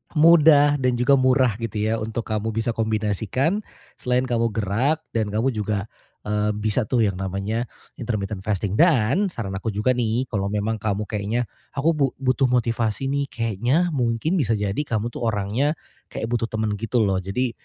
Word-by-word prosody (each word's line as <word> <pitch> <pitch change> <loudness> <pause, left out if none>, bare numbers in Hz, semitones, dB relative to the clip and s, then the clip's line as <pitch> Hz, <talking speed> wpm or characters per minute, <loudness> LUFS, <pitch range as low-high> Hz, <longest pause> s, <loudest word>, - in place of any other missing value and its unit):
mudah, 150 -2 +6
dan 125 -1 +1
juga 125 +4 +4
murah, 130 -3 +3
gitu 110 -2 -3
ya, 110 +1 0
untuk 110 +1 -3
kamu 110 0 -1
bisa 115 +1 0
kombinasikan 110 - 0 0.4
selain 125 0 +1
kamu 115 -2 +1
gerak 120 +10 0
dan 110 -2 0
kamu 110 +6 0
juga, 105 -3 -2 0.4
eee, 105 0 0
bisa 105 +2 -1
tuh 120 -1 +2
yang 100 -3 -1
namanya 100 +5 -2 0.3
intermittent 105 -4 -3
fasting. 105 0 -2
Dan 165 - +4
saran 110 -10 -5
aku 115 - -7
juga 105 +4 +1
nih 120 0 0
kalau 100 -3 -1
memang 105 +2 -1
kamu 105 0 -1
kayaknya, 105 +3 -2 0.3
"Aku 145 +4 +2
bu 140 -5 0
butuh 135 0 +2
motivasi 115 -2 0
nih." 140 0 0
kayaknya 120 - 0
mungkin 130 +6 0
bisa 115 -6 +1
jadi 100 +1 -2
kamu 120 -5 -2
tuh 120 - -3
orangnya 110 +8 0 0.3
kayak 110 - -5
butuh 115 -1 0
temen 110 -1 -1
gitu 115 +1 +1
loh. 95 -2 +1
Jadi 105 +7 -2
115 Hz, 170 wpm, -23 LUFS, 105-130 Hz, 0.4 s, mudah